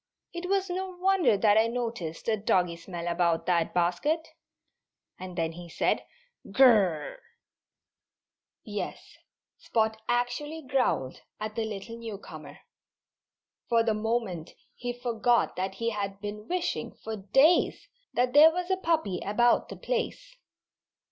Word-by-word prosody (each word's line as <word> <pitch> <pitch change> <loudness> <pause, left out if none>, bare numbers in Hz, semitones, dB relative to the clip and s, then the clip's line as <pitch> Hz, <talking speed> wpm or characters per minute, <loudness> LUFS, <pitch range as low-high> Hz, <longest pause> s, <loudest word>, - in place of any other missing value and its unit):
"It 350 +1 -5
was 390 -1 +1
no 375 +1 -3
wonder 370 - +3
that 210 +1 +5
I 225 - +3
noticed 230 -9 -4
a 225 - +3
doggy 180 -4 +1
smell 170 0 -7
about 170 -1 +1
that 170 -2 +1
basket." 290 - 0 0.9
And 185 -1 -8
then 165 -1 0
he 170 +1 -10
said, - - 0 0.5
"G 260 +7 +4
r 255 - +10
r 205 -5 +4 0.2
r!" - - -15 1.4
Yes! 210 -2 -6 0.4
Spot 220 -1 0
actually 245 +6 -1
growled 255 - 0 0.2
at 215 0 -4
the 225 0 -2
little 220 +2 -6
newcomer. 220 -3 -9 1.1
For 230 -1 +4
the 225 -1 +1
moment 215 -6 -2 0.2
he 245 0 -4
forgot 240 -1 +1
that 190 +1 -3
he 230 +3 -1
had 200 -2 -4
been 210 +1 -6
wishing, 360 -1 -2
for 220 - -4
days, 270 - +3 0.3
that 250 +1 +2
there 300 +2 +9
was 360 +2 -3
a 375 - +2
puppy 315 - 0
about 240 +4 +2
the - - -8
place. - - -3
225 Hz, 140 wpm, -28 LUFS, 195-275 Hz, 1.4 s, r